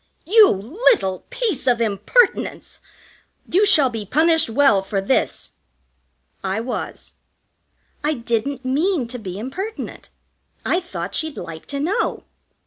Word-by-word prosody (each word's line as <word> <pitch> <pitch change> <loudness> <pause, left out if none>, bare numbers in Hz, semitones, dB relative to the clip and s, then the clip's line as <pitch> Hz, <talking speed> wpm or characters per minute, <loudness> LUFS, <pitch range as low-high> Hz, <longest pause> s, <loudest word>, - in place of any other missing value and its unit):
"You 425 +3 +7
little 210 - +1
piece 415 - -2
of 245 -2 +3
impertinence! 230 - +1 0.7
You 405 +3 +3
shall 295 -10 +5
be 225 -2 -4
punished 320 - +2
well 225 -5 +4
for 195 +1 -2
this." 200 +7 0 0.9
I 195 +2 -1
was. 240 +2 -5 0.9
I 300 +1 +1
didn't 240 +3 -2
mean 295 +1 +1
to 250 0 -5
be 190 -4 -6
impertinent. 370 - -6 0.6
I 350 - +2
thought 355 -1 -6
she'd 315 -3 -3
like 160 -1 -8
to 280 - -3
know. 330 +8 -1
265 Hz, 125 wpm, -21 LUFS, 220-345 Hz, 0.9 s, You